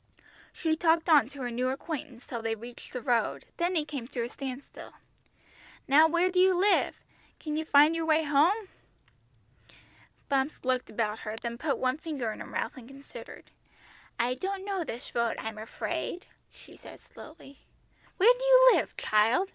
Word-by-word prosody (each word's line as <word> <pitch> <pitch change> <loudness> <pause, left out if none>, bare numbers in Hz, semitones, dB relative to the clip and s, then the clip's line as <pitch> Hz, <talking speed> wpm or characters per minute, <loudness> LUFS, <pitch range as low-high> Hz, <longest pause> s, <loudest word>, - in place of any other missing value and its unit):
She 320 -2 -1
talked 325 +1 +2
on 290 -7 +6
to 275 -1 -8
her 245 - -3
new 250 +2 -1
acquaintance 275 -2 -6
till 235 -2 -5
they 225 0 -1
reached 235 +2 -11
the 250 -2 -6
road, 240 -3 0
then 350 +1 0
he 310 -3 +1
came 280 -6 -6
to 245 -2 -3
a 235 - -4
standstill. 270 0 -8 0.9
"Now 300 +4 +6
where 345 +3 +1
do 365 - +1
you 375 0 +5
live? 405 +2 +3 0.4
Can 300 -1 -4
you 315 +1 -2
find 300 +2 +5
your 325 -1 -2
way 315 0 +3
home?" 335 +9 +2 1.6
Bumps 275 +1 0
looked 255 -1 0
about 215 -1 -2
her, 215 0 -5
then 235 0 -5
put 290 -1 -1
one 255 +3 -1
finger 280 -9 -3
in - - -9
her - - -7
mouth - - -4
and 240 -2 -11
considered. 275 +1 -12 0.7
"I 245 +2 +1
don't 385 +8 -4
know 390 -3 -2
this 240 -6 -8
road, 235 -1 0
I'm 220 -1 -6
afraid," 325 +10 -4 0.3
she - - -17
said - - -13
slowly. 295 -3 -14 0.6
"Where 445 +6 +7
do - - -5
you - - +7
live, - - -1
child?" 225 - +2
285 Hz, 175 wpm, -29 LUFS, 245-330 Hz, 1.6 s, Where